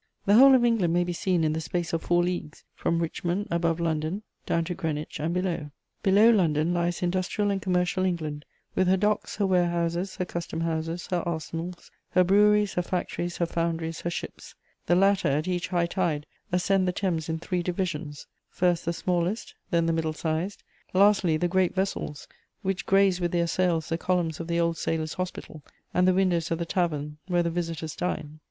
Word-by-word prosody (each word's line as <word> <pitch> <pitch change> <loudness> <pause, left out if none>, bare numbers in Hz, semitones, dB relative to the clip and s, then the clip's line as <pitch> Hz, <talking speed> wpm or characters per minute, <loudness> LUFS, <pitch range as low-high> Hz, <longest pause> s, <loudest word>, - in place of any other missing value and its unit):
The 200 - +4
whole 265 +4 +9
of 245 -2 +4
England 220 -8 +2
may 175 0 +3
be 175 0 -3
seen 180 -2 0
in 155 -1 +2
the 160 - -2
space 170 +2 -3
of 165 - 0
four 175 0 +2
leagues, 175 -4 -4
from 170 0 0
Richmond, 175 +4 -2
above 170 -1 +1
London, 165 +4 -1 0.2
down 170 - +1
to 180 +2 -3
Greenwich 155 -2 -4
and 160 +3 -1
below. 175 -4 -2 0.3
Below 210 +3 +6
London 165 -5 +2
lies 175 0 -1
industrial 185 +3 0
and 195 -1 -1
commercial 180 0 +1
England, 155 -5 -2 0.3
with 185 - +2
her 190 +1 +4
docks, 210 +2 0
her 205 - +1
warehouses, 175 0 0
her 180 - -2
custom 170 -2 -4
houses, 165 +1 -2
her 175 -1 +1
arsenals, 170 +1 -5 0.2
her 185 - +5
breweries, 210 +2 +4
her 180 - +1
factories, 175 -1 -3
her 170 - +1
foundries, 165 -1 -2
her 175 - -2
ships; 175 - -7 0.3
the 175 - +4
latter, 195 -1 +3
at 150 +4 0
each 180 -1 -1
high 175 -2 +1
tide, 170 -4 -1 0.3
ascend 185 +1 +2
the - - +2
Thames 175 -4 -2
in 160 - -1
three 175 +2 -2
divisions: 170 -4 -3 0.2
first, 175 -2 +1
the 170 - 0
smallest; 180 +4 -1 0.2
then, 170 -1 +2
the 165 - +1
middle 160 -1 -1
sized; 160 +5 -3 0.3
lastly, 195 -4 +4
the 175 - +1
great 185 0 +1
vessels 190 -6 -3 0.4
which 190 -1 -2
graze 195 -2 +4
with 175 -1 0
their 170 -1 +2
sails 170 -2 0
the 165 0 -1
columns 175 -4 0
of 165 - -5
the 170 0 0
Old 170 -1 +1
Sailors' 160 -1 -1
Hospital 175 -4 -6 0.3
and 180 +1 +3
the 185 - +5
windows 175 -3 +1
of 165 - 0
the 170 - -3
tavern 150 -4 -1
where 175 -2 +2
the 170 - -1
visitors 165 -2 -3
dine. 155 -4 -3
175 Hz, 195 wpm, -27 LUFS, 165-185 Hz, 0.4 s, whole